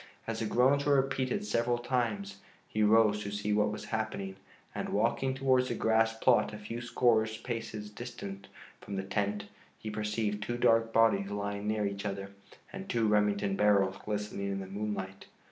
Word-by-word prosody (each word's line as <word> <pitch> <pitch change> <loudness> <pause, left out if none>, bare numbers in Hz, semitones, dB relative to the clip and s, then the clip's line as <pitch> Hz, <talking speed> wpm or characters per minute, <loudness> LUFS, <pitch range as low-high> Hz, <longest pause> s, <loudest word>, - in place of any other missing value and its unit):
As 115 -1 -3
the 115 - -1
groans 130 +5 +3
were 145 -1 +4
repeated 135 +9 0
several 120 - +1
times, 115 -5 -2 0.3
he 110 - -2
rose 105 0 +5
to 100 - -4
see 105 +1 -1
what 105 0 +2
was 105 - -6
happening 110 -3 -2 0.4
and, - - -3
walking 130 -1 +1
towards 130 -1 +3
the - - -2
grass 115 0 +2
plot 125 +2 +3
a 105 - -7
few 110 +3 -6
score 120 -1 +3 0.2
paces 110 -3 -5
distant 100 -4 -7 0.3
from 100 - -7
the 95 - -2
tent, 100 +1 -1 0.3
he 110 - -6
perceived 105 0 -2
two 120 +3 -2
dark 115 -1 +3
bodies 110 -3 +3
lying 100 0 -3
near 105 -1 0
each 100 0 -3
other 100 -1 -4 0.4
and 195 0 -7
two 115 -2 +2
Remington 105 -2 +2
barrels 100 -2 +3
glistening 105 -1 -3
in 95 - -2
the 95 - -5
moonlight. 95 -1 -5
105 Hz, 175 wpm, -31 LUFS, 100-115 Hz, 0.4 s, rose